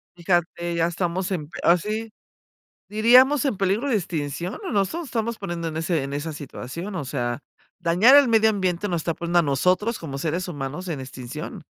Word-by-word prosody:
Fíjate, 175 -1 -1
ya 165 0 +2
estamos 175 +1 -2
en 160 -6 -2
p - - -9
así, 210 +6 +1 0.8
diríamos 250 +6 +5
en 265 -8 0
peligro 200 +8 0
de 245 - +2
extinción 170 -1 -3
o 380 - -4
nos 200 0 +1
nos 340 0 -4
estamos 230 -3 -2
poniendo 175 -4 -4
en 160 - -5
ese 160 -2 0
en 140 +1 -5
esa 145 +3 -3
situación, 150 +6 -7
o 170 - -3
sea, 120 -2 -2 0.4
dañar 180 +10 +5
el 285 -2 +7
medio 220 -1 +5
ambiente 190 -1 -1
nos 175 -3 -1
está 165 - -1
poniendo 170 +2 +1
a - - +6
nosotros 180 - +1
como 140 -5 -6
seres 165 +5 -2
humanos 150 +2 -5
en 155 -5 -3
extinción, 130 -2 -7
175 Hz, 190 wpm, -24 LUFS, 160-210 Hz, 0.8 s, el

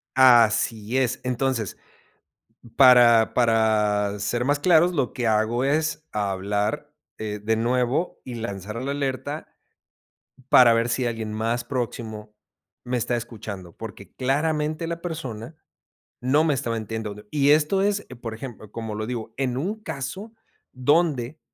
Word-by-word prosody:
Así 115 -2 +4
es, 130 0 +1
entonces 125 -4 -1 1.0
para 120 -4 +7
para 105 -3 +2
ser 120 +4 -1
más 145 +1 +1
claros, 175 +2 +4
lo 135 -6 -1
que 120 -2 -1
hago 110 +3 +1
es, 155 +2 0
hablar, 100 +1 -2 0.2
eh, 105 -1 -4
de 110 +1 +1
nuevo, 125 +7 0
y 125 - -7
lanzar 105 -1 -5
la 135 +2 -2
alerta 140 +1 -3 1.0
para 120 -2 +7
ver 115 +1 +1
si 125 +2 0
alguien 115 -2 -3
más 115 +3 -1
próximo 110 -4 -5 0.5
me 125 0 -2
está 120 +1 -1
escuchando. 105 -7 -7
Porque 100 -4 -10
claramente 150 +4 0
la 170 0 -4
persona 145 -7 -6 0.7
no 135 +5 +3
me 150 - +2
estaba 115 -3 -2
entiendo 110 -1 -4
de 105 +1 -13
y 140 -1 +2
esto 155 +6 +4
es, 205 0 0
e 130 - -9
por 115 -2 -6
ejemplo, 110 -3 -9
como 110 -1 -5
lo 110 0 -4
digo, 115 -2 -5
en 130 -2 -1
un 205 +10 -3
caso, 190 - -6 0.4
donde 145 0 +1
120 Hz, 140 wpm, -24 LUFS, 110-140 Hz, 1.0 s, para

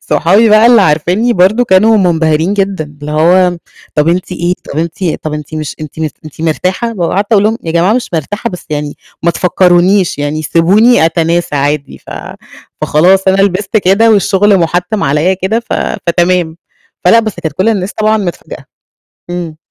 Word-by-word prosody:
صحابي 200 +8 +2
بقى 215 +2 +5
اللي 235 -4 +5
عارفينني 180 +9 +1
برضو 200 +6 +2
كانوا 215 +3 +3
منبهرين 165 -1 +1
جدًا، 195 -4 -1 0.2
اللي 150 +1 -6
هو: 175 +3 +2 0.4
"طَب 150 +1 +1
أنتِ 180 +1 -1
إيه؟ 175 0 -1 0.2
طَب 150 - -3
أنتِ 170 +3 -4 0.2
طَب 155 - -4
أنتِ 150 +1 -7
مش 155 -2 -5
أنتِ 155 0 -9
م 155 - -1 0.2
أنتِ 155 +1 -12
مرتاحة؟" 185 +8 -2
وقعدت 195 +5 -1
أقول 205 -2 +4
لهم: 220 +1 +1
"يا 165 - -4
جماعة 175 +5 +2
مش 250 +1 -1
مرتاحة 205 - -3
بس 180 - -9
يعني 145 -1 -4 0.3
ما 170 - +2
تفكرونيش 180 +1 +2
يعني 145 +2 -3
سيبوني 195 +8 +3
أتناسى 165 0 -1
عادي." 145 0 -2
ف - - -32 0.8
فخلاص 185 +5 +3
أنا 195 +1 +3
لِبست 195 +2 -1
كده 205 +3 +3
والشغل 200 0 +3
مُحتِّم 180 +5 -1
عليّا 150 +7 +1
كده 195 +5 -2
ف 235 - -8 0.3
فتمام. 170 -1 0 0.5
فلا 230 +6 +5
بس 215 -3 -4
كانت 160 -4 -3
كل 190 +7 0
الناس 200 -3 -1
طبعًا 215 0 +1
متفاجئة. 185 -5 -6 0.7
إمم. 175 -3 -5
180 Hz, 170 wpm, -11 LUFS, 160-205 Hz, 0.8 s, بقى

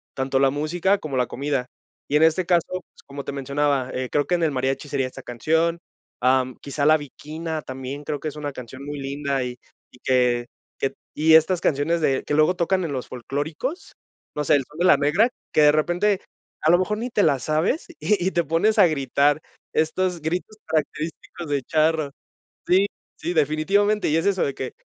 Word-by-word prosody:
tanto 135 0 0
la 135 -1 +4
música, 170 +7 +1
como 145 -7 -4
la 125 - +2
comida. 135 -2 -2 0.4
Y 145 - -1
en 150 - +5
este 165 +3 +3
caso, 175 -2 +3
pues, 185 - -8
como 140 0 -7
te - - -3
mencionaba, 140 -1 0
eh, 130 -1 -3
creo 145 - +2
que - - -2
en 170 - -1
el 160 - +3
mariachi, 135 +2 -1
sería 135 -2 0
esta 130 - -10
canción. 160 +7 0 0.5
Am, 130 0 +3
quizá 140 0 -2
La 155 0 +6
Bikina 155 +2 -6
también, 130 +2 -6
creo 145 0 -3
que 155 - -5
es 150 - -11
una 145 -1 -4
canción 130 +1 -9
muy 145 -1 -5
linda, 140 -1 -2
y 125 0 -5 0.3
y 125 - -19
que 125 -2 +2 0.3
que 135 0 -1 0.2
y 160 +1 +4
estas 165 +3 +4
canciones, 155 +4 +1
de 135 -3 +1
que - - -2
luego 155 +4 +4
tocan 185 +2 +1
en 160 -4 -3
los 130 -2 -4
folclóricos, 150 - -4 0.4
no 150 - -1
sé, 145 - +4
El 140 - +2
Son 150 - -15
de 180 - +2
la 180 - +7
Negra, 150 - +3 0.2
que - - +3
de 150 - +7
repente, 175 +6 +1 0.4
a 155 - +4
lo 175 - +6
mejor 210 +3 -1
ni 245 +2 -3
te 210 -3 +2
la 140 -4 +3
sabes, 155 - 0
y 195 -4 +1
y - - +1
te 170 - +1
pones 165 +8 +2
a 190 - +8
gritar. 145 0 +2 0.3
Estos 175 +2 0
gritos, 180 +7 -3
característicos 160 +1 -3
de 145 -2 0
charro. 155 -1 +1 0.6
Sí, 190 +3 +4 0.3
sí, 175 - -3
definitivamente, 185 +8 +2
y 155 - +2
es 165 - 0
eso, 195 -2 +2
de 140 - -2
que, 130 -1 -5
150 Hz, 205 wpm, -23 LUFS, 140-170 Hz, 0.6 s, a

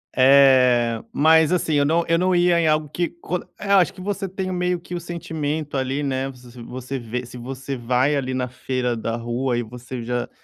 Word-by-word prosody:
É, 130 -4 +5
mas 160 +2 +4
assim 170 -3 +1
eu 145 -1 +3
não 165 +3 +2
eu 165 +1 +2
não 185 0 +2
ia 175 -1 +4
em 160 - +2
algo 155 0 +2
que 170 +4 -2
co 180 - -2 0.2
é, 200 - -6
acho 185 -3 +5
que - - -16
você 195 0 -3
tem 190 0 -4
meio 180 0 0
que 180 - -10
o 175 - -2
sentimento 155 -3 -4
ali 135 +2 -1
né, 135 0 -1
você 125 -2 -13
você 130 +3 -6
vê 120 +2 -5
se 120 - -12
você 130 +2 -6
vai 125 +4 +1
ali 130 -2 -2
na 125 0 -1
feira 125 -1 -2
da 115 0 -3
rua 120 +1 -2
e 120 - -1
você 125 +1 -8
já 120 +1 -2
135 Hz, 215 wpm, -22 LUFS, 125-165 Hz, 0.2 s, É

